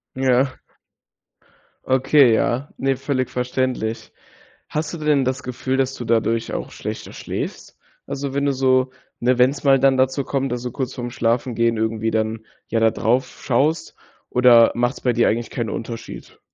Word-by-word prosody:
Ja. 130 0 +1 1.3
Okay. 130 -1 +4
Ja, 125 +5 0
ne, 135 0 +1
völlig 135 -1 -2
verständlich. 125 -2 -2 0.6
Hast 155 +2 -3
du - - -4
denn 150 -3 +2
das 130 +2 -2
Gefühl, 130 +1 -2
dass 135 0 0
du 120 - -6
dadurch 115 0 0
auch - - -4
schlechter - - -6
schläfst? - - -6 0.3
Also, 140 0 -4
wenn 140 0 0
du 140 - +2
so 130 0 +2 0.3
ne, 125 +1 +2
wenn's 135 +3 +3
mal 135 -1 +5
dann 135 0 +4
dazu 130 +1 +1
kommt, 135 -1 -2
dass 120 -1 -2
du 125 - -4
kurz 130 -1 -4
vorm 120 -2 -5
Schlafengehen 115 -1 0
irgendwie 110 0 -1
dann, 110 0 -2 0.2
ja, 115 - +1
da 110 -1 +4
drauf 125 +3 -1
schaust, 145 +6 0 0.3
oder 120 -2 +6
machts 120 +2 -1
bei 125 - +2
dir 120 0 +3
eigentlich 115 +1 -1
keinen 115 -4 -3
Unterschied? 115 0 -7
130 Hz, 165 wpm, -21 LUFS, 115-135 Hz, 1.3 s, oder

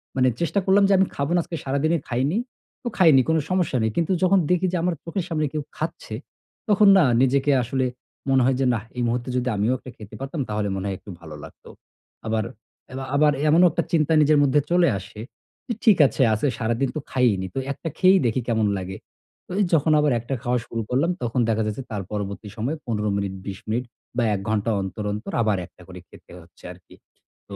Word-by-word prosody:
মানে 130 -1 +3
চেষ্টা 170 +4 +1
করলাম 195 +1 +4
যে - - +5
আমি 190 - +4
খাবো 140 +3 -2
না, 175 - +3
আজকে 170 - -6
সারাদিনে 140 +5 +1
খাইনি। 135 - 0 0.5
তো - - -4
খাইনি 160 -8 +6
কোন 160 - +3
সমস্যা 180 -7 +1
নেই। 110 - +1
কিন্তু 170 +2 +1
যখন 190 +1 +5
দেখি 180 +1 +2
যে - - +1
আমার 180 0 +1
চোখের 170 +1 -3
সামনে 155 -2 0
কেউ 155 - -1 0.2
খাচ্ছে, - - -5 0.5
তখন 210 0 +5
না 185 - +6 0.2
নিজেকে 135 +2 +3
আসলে 130 +2 -1 0.4
মনে 135 -1 +4
হয় 130 +1 +2
যে, 135 - +2
"নাহ 110 -3 -2
এই - - -1
মুহূর্তে 120 +2 -2
যদি 125 0 -1
আমিও 105 +5 +1
একটা 130 - -11
খেতে 105 0 -11
পারতাম, 140 +3 -4
তাহলে 105 -1 -1
মনে 95 0 -4
হয় 100 - -2
একটু - - -15
ভালো 80 -2 -9
লাগতো।" - - -13 0.6
আবার, 110 0 0 0.5
এ - - -10 0.2
আবার 150 +1 +5 0.2
এমনও 170 +4 +6
একটা 170 - -1
চিন্তা 160 -1 +2
নিজের 150 0 +4
মধ্যে 140 +1 +3
চলে 175 0 +4
আসে, 95 +2 -10 0.5
যে 235 - -1
ঠিক 215 -5 +6
আছে - - -3
আছে 110 +7 0
সারাদিন 120 +3 0
তো - - -1
খাইইনি, 110 -8 +1
তো - - 0
একটা 165 +4 -5
খেয়েই 190 +1 +5
দেখি 120 +2 +1
কেমন 110 -3 +1
লাগে। 95 0 -6 0.5
তো - - -12 0.2
যখন 155 0 +3
আবার 150 -1 +2
একটা 120 +4 -4
খাওয়া 125 0 +1
শুরু 115 - -4
করলাম, 140 +8 +1
তখন 120 +2 -1
দেখা 110 0 +1
যাচ্ছে 110 +5 -4
তার 105 -2 -3
পরবর্তী 100 0 -4
সময় 125 +8 -2
১৫ 105 -3 -1
মিনিট, 100 -1 -2
২০ 95 -1 -6
মিনিট 120 +3 -1 0.3
বা 120 - +2
১ - - -3
ঘন্টা 110 +1 0
অন্তর, 95 +2 -5
অন্তর 105 +2 -6
আবার 105 -3 +1
একটা - - -20
করে - - -10
খেতে - - -17
হচ্ছে 85 +1 -21
আরকি। 90 0 -19 0.5
তো - - -7
130 Hz, 210 wpm, -23 LUFS, 110-160 Hz, 0.6 s, খাইনি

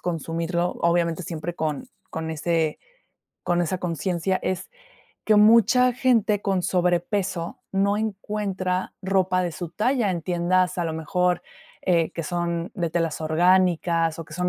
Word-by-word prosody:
consumirlo, 170 +1 -2
obviamente, 170 0 +1
siempre 170 +1 -5
con 155 -3 -3 0.2
con 160 0 -4
ese 160 0 0 0.7
con 175 0 +1
esa 180 +2 -2
consciencia, 180 +2 -1
es 185 -1 -2 0.6
que 215 - +4
mucha 235 +4 +6
gente 230 -5 +2
con 195 -3 0
sobrepeso 180 0 0
no 200 +1 +2
encuentra 195 -3 -2
ropa 185 -1 +1
de 175 - -1
su 175 -1 -5
talla 230 +1 +1
en 170 - -4
tiendas, 180 +2 +1
a 175 - 0
lo 160 - -2
mejor, 180 +3 0 0.4
eh, 170 -3 +2
que 165 - -4
son 170 +1 -2
de 170 -4 -1
telas 165 -2 -1
orgánicas 170 0 +2
o - - -6
que - - -15
son 180 0 0
180 Hz, 145 wpm, -24 LUFS, 170-190 Hz, 0.7 s, mucha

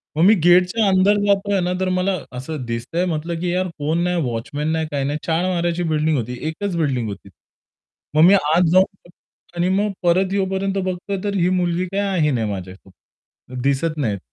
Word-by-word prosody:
मग 160 - +2
मी 210 - +7
गेटच्या 180 +5 +4
अंदर 195 +2 +4
जातोय 200 -1 +1
ना, 180 +1 -1
तर 185 0 0
मला 185 +1 0 0.2
असं 130 0 -5
दिसतंय 120 +10 -2
म्हटलं, 165 0 -3
की 175 0 -1
यार 185 0 0
फोन 160 +4 0
नाही 180 -1 0
वॉचमन 130 +5 -3
नाही 160 -1 -1
काही 140 -1 -1
नाही. 145 +2 -2
4 165 +2 +1
माळ्याची 175 -1 -1
बिल्डिंग 155 -1 +1
होती, 125 +1 -4
एकच 180 +4 -3
बिल्डिंग 130 -8 0
होती. 100 0 -9 0.9
मग 155 - +6
मी 190 - +7
आत 170 -1 +3
जाऊन 185 -1 +1 0.5
आणि 175 +1 0
मग 205 +2 +1
परत 185 +2 +2
येईपर्यंत 195 0 -1
बघतो 185 +2 -4
तर 200 -1 -2
ही 180 -1 +2
मुलगी 180 -1 0
काही 200 +1 0
आहे 160 -6 +1
नाही, 115 -4 -1
माझ्यासोबत 95 +6 -11
दिसत 140 +4 0
नाहीत. 110 -9 -1
175 Hz, 185 wpm, -20 LUFS, 145-185 Hz, 0.9 s, मी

